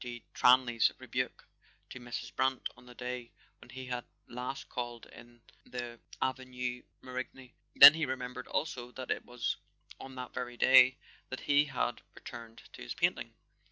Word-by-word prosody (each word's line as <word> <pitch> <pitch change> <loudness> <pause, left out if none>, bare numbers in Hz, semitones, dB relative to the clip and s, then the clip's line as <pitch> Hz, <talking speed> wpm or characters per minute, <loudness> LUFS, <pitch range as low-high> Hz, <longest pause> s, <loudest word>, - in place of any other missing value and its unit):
de 120 -2 -7
Tranlay's 125 -2 +5
rebuke - - -4 0.4
to 125 - -7
Mrs. 120 -1 -6
Brant 130 0 +1
on 120 +1 -18
the 125 - -13
day 125 -1 -5 0.3
when - - -16
he 130 0 -8
had 125 -1 -3 0.2
last 125 +3 -5
called 120 -1 -5
in 120 0 -16 0.2
the 120 -1 -7 0.2
Avenue 125 -1 -3 0.2
Marigny; 130 0 -7 0.2
then 140 +1 +12
he 160 -2 -1
remembered 125 -1 -5
also 125 -6 -3
that 130 -1 -5
it - - -1
was 125 -1 -2 0.4
on 135 0 -9
that 125 -1 -7
very 125 -1 -5
day 130 +1 +7 0.3
that 130 - -5
he 145 +1 +4
had 125 -4 -2
returned 115 -1 -10
to - - -11
his - - -6
painting. - - 0
125 Hz, 160 wpm, -32 LUFS, 120-130 Hz, 0.4 s, then